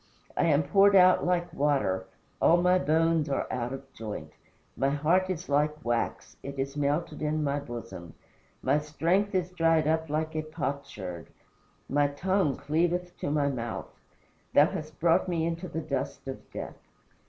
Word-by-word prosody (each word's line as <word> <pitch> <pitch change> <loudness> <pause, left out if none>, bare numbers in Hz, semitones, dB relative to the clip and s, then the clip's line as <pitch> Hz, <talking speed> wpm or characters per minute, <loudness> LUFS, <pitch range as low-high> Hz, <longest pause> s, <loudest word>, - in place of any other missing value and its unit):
I - - +2
am 155 -2 +3
poured 195 +7 +5
out 185 -1 +6
like 175 -1 0
water; 135 - +1 0.3
all 170 - +6
my 180 +1 +4
bones 160 -1 +2
are 135 - 0
out 120 -1 -2
of 135 0 -8
joint. 105 -9 -6 0.4
My 135 - +1
heart 165 +7 +2
is 180 -1 -3
like 150 +1 0
wax 120 0 -2
it 140 0 -7
is 135 +1 -3
melted 145 +3 -1
in 155 0 0
my 140 0 0
bosom. 115 - -8 0.5
My 140 +3 +3
strength 170 +7 0
is 180 -1 0
dried 165 -3 +2
up 160 0 +1
like 155 +1 -2
a 155 - 0
potsherd. 140 - -5 0.6
My 145 +2 +2
tongue 170 +1 0
cleaveth 175 +4 0
to - - -2
my 145 -1 +2
mouth. 120 -4 -5 0.6
Thou 145 - +8
hast 155 -1 -7
brought 170 +3 +3
me 165 -2 0
into 170 +2 -3
the 160 - -4
dust 140 -3 -4
of 135 - -7
death. - - -7
150 Hz, 165 wpm, -28 LUFS, 140-170 Hz, 0.6 s, Thou